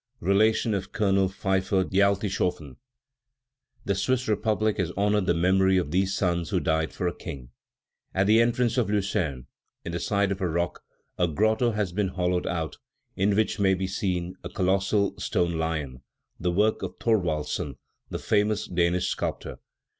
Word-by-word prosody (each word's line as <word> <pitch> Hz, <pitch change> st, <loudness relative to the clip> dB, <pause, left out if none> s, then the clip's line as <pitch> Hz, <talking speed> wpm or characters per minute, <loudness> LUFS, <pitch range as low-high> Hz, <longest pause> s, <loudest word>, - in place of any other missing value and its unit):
(Relation 110 Hz, +4 st, +3 dB
of 100 Hz, -1 st, -3 dB
Colonel 100 Hz, -3 st, +2 dB
Pfyffer 95 Hz, 0 st, 0 dB
d'Altishoffen.) 95 Hz, -6 st, 0 dB, 1.1 s
The 100 Hz, -, +1 dB
Swiss 125 Hz, +6 st, 0 dB
republic 110 Hz, 0 st, +1 dB
has 90 Hz, -4 st, 0 dB
honored 105 Hz, -1 st, +2 dB
the 85 Hz, -, +3 dB
memory 95 Hz, +2 st, +3 dB
of 85 Hz, -5 st, -1 dB
these 95 Hz, +2 st, +1 dB
sons 85 Hz, -3 st, 0 dB
who -, -, +1 dB
died 80 Hz, 0 st, 0 dB
for 90 Hz, -, -2 dB
a 85 Hz, -, -1 dB
king. 70 Hz, -7 st, -8 dB, 0.7 s
At 95 Hz, +1 st, +3 dB
the 110 Hz, +3 st, +5 dB
entrance 120 Hz, +1 st, +1 dB
of 110 Hz, -5 st, 0 dB
Lucerne, 95 Hz, -, -1 dB, 0.4 s
in 85 Hz, -, -4 dB
the 85 Hz, -, -3 dB
side 100 Hz, 0 st, +1 dB
of 95 Hz, 0 st, -3 dB
a 90 Hz, -, +1 dB
rock, 85 Hz, +2 st, -2 dB, 0.4 s
a 90 Hz, -, +3 dB
grotto 110 Hz, +9 st, +2 dB
has 105 Hz, -3 st, -1 dB
been 100 Hz, +2 st, 0 dB
hollowed 90 Hz, -1 st, -1 dB
out, 80 Hz, -2 st, -3 dB, 0.4 s
in 100 Hz, +1 st, +2 dB
which 110 Hz, 0 st, +1 dB
may 95 Hz, -1 st, +3 dB
be 95 Hz, +1 st, -2 dB
seen 90 Hz, -2 st, -2 dB
a 85 Hz, -, -5 dB
colossal 95 Hz, +2 st, +1 dB
stone 85 Hz, -5 st, 0 dB
lion, 75 Hz, -6 st, -3 dB, 0.4 s
the 90 Hz, -, 0 dB
work 105 Hz, +5 st, +2 dB
of -, -, -5 dB
Thorwaldsen, 80 Hz, -, -1 dB, 0.3 s
the -, -, -3 dB
famous 105 Hz, 0 st, +1 dB
Danish 90 Hz, 0 st, +1 dB
sculptor. -, -, -3 dB
95 Hz, 160 wpm, -26 LUFS, 85-105 Hz, 1.1 s, the